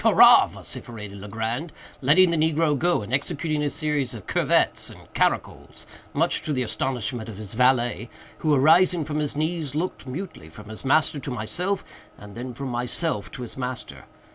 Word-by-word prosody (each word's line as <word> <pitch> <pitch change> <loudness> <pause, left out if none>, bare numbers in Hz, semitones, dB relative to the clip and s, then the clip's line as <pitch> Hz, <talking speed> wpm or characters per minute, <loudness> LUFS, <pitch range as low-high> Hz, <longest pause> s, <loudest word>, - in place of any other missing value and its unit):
hurrah!" - - +8
vociferated 105 -4 -7
Legrand, 110 - -4 0.3
letting 170 +7 +5
the - - +1
negro 160 -1 +2
go, 170 -5 +1
and 115 - -7
executing 150 +3 0
a 145 - +1
series 145 -5 -1
of 105 - -10
curvets - - +2
and - - -12
caracols, - - -1 0.3
much - - +1
to 155 - -4
the 130 -2 0
astonishment 120 -1 -2
of 105 - -8
his 105 -1 -5
valet, 120 -1 +2 0.3
who, 155 - +1
arising 160 +4 +4
from 150 0 -2
his 150 -2 0
knees, 155 -2 -2
looked, 170 -2 -3
mutely, 130 - -7
from 105 +6 -12
his 110 - -7
master 150 +2 +2
to 140 - -6
myself, 165 - -2 0.3
and 105 0 -12
then 125 +3 -6
from 135 +2 -6
myself 125 +7 -2
to 135 -4 -7
his 120 - -7
master. 125 -2 -5
135 Hz, 170 wpm, -24 LUFS, 120-155 Hz, 0.3 s, hurrah